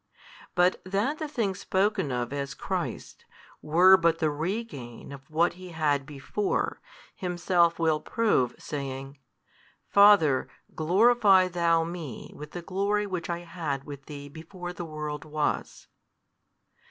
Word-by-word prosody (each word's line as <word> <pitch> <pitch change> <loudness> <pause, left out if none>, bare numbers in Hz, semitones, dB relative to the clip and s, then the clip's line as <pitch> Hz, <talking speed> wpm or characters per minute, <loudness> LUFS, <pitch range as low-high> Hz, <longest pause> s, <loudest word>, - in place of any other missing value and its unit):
But 180 +1 +3
that 205 +11 -1
the 310 - -3
things 205 -9 -2
spoken 190 -5 0
of 125 +1 -2
as 140 -1 -4
Christ's, - - -4 0.4
were 180 +5 +6
but 165 -1 +2
the 155 -2 +1
regain 150 - -5
of 135 -1 -11
what 165 +3 +2
He 185 0 -11
had 145 -4 0
before, 150 +8 -2 0.3
Himself 175 -1 +1
will 160 -2 +2
prove, 150 - +1
saying, 135 -1 -6 0.7
Father, 200 -10 +6 0.2
glorify 195 +2 +4
Thou 170 -2 +2
Me 165 -7 -7
with 150 0 -10
the 175 - -6
glory 200 +3 0
which 180 -4 -4
I 170 0 -2
had 165 -6 -4
with 140 -1 -10
Thee 145 -1 -8
before 175 +4 -8
the 175 -1 -6
world 150 -2 -5
was. 155 -1 -2
165 Hz, 130 wpm, -27 LUFS, 145-190 Hz, 0.7 s, were